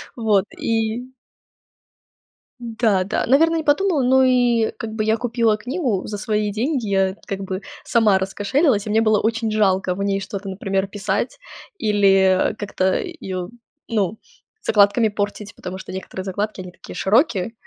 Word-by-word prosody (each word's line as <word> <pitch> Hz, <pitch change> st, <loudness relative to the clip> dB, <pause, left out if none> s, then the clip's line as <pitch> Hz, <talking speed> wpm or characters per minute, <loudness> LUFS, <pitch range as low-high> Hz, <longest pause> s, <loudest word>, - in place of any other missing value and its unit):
Вот, 215 Hz, -5 st, +2 dB
и 225 Hz, +2 st, -1 dB, 1.5 s
Да, 225 Hz, -5 st, 0 dB
да, 200 Hz, -, -1 dB
наверно, 325 Hz, +6 st, +4 dB
не 320 Hz, -, -1 dB
подумала. 305 Hz, +1 st, +2 dB
Но 260 Hz, +1 st, +4 dB
и, 245 Hz, -3 st, +3 dB
как 225 Hz, -2 st, -5 dB
бы, 220 Hz, -1 st, -1 dB
я 220 Hz, 0 st, +3 dB
купила 230 Hz, -2 st, +1 dB
книгу 245 Hz, -, -2 dB
за 210 Hz, -, -5 dB
свои 210 Hz, 0 st, -1 dB
деньги. 240 Hz, +3 st, -1 dB
Я, 190 Hz, -1 st, +1 dB
как 195 Hz, -, -4 dB
бы, 190 Hz, 0 st, -4 dB, 0.2 s
сама 215 Hz, -5 st, +3 dB
раскошелилась. 205 Hz, -, +1 dB
И -, -, -5 dB
мне 220 Hz, +1 st, +3 dB
было 215 Hz, -2 st, +3 dB
очень 225 Hz, 0 st, 0 dB
жалко 190 Hz, -3 st, +1 dB
в 200 Hz, -, -3 dB
ней 200 Hz, 0 st, 0 dB
что-то, 195 Hz, 0 st, -6 dB
например, 195 Hz, 0 st, -2 dB
писать 205 Hz, -, -2 dB, 0.4 s
или, 195 Hz, -3 st, +3 dB
э, -, -, -12 dB
как-то 190 Hz, -3 st, -1 dB
её, 190 Hz, -, -5 dB, 0.4 s
ну, 215 Hz, -2 st, -1 dB, 0.4 s
закладками 205 Hz, +2 st, +4 dB
портить, 205 Hz, 0 st, -4 dB
потому 180 Hz, +1 st, -7 dB
что 190 Hz, -, -9 dB
некоторые 190 Hz, 0 st, -6 dB
закладки 205 Hz, +2 st, -3 dB
они 180 Hz, -1 st, -9 dB
такие -, -, -12 dB
широкие. 225 Hz, -, +1 dB
210 Hz, 155 wpm, -21 LUFS, 195-235 Hz, 1.5 s, наверно